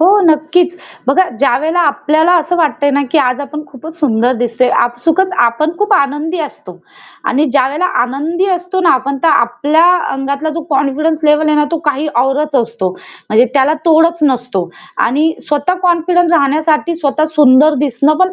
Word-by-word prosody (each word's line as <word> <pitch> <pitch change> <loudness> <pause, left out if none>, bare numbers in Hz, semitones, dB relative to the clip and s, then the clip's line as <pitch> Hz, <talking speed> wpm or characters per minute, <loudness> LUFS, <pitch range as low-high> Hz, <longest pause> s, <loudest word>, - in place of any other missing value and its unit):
हो, 330 - +4 0.2
नक्कीच. 330 +3 +1 0.3
बघा 350 +8 +2
ज्यावेळेला 295 +6 +1
आपल्याला 310 +4 +1
असं 335 +2 -2
वाटतंय 300 -3 0
ना, 285 +1 0
की 320 - +3
आज 255 -1 0
आपण 300 +1 -7
खूपच 315 +5 -12
सुंदर 245 -4 +1
दिसतोय 245 +1 0 0.2
आपसुकच 325 +10 -1
आपण 305 +8 -2
खूप 415 0 0
आनंदी 295 +3 -1
असतो 295 - -8 0.5
आणि 290 +4 +1
ज्यावेळेला 280 +5 0 0.2
आनंदी 300 +9 -2
असतो 360 +1 -3
ना 355 - +3
आपण, 275 +2 -2
तर 330 - +3
आपल्या 290 +6 +2 0.3
अंगातला 280 +3 -3
जो 335 - -3
कॉन्फिडन्स 290 +3 0
लेव्हल 300 +1 +3
आहे 305 - +2
ना 295 - +3
तो 335 - 0
काही 290 +3 -3
औरच 285 +2 -1
असतो 225 -5 -4
म्हणजे 220 +5 -1
त्याला 280 +2 +2
तोडच 330 +1 +3
नसतो 245 -10 -1 0.4
आणि 305 +6 0 0.2
स्वतः 295 +4 0
कॉन्फिडन्स 350 0 +1
राहण्यासाठी 310 +3 +1
स्वतः 310 -1 -1
सुंदर 295 +2 +5
दिसणं 280 +3 +1
पण 370 0 +2
300 Hz, 160 wpm, -13 LUFS, 270-325 Hz, 0.5 s, सुंदर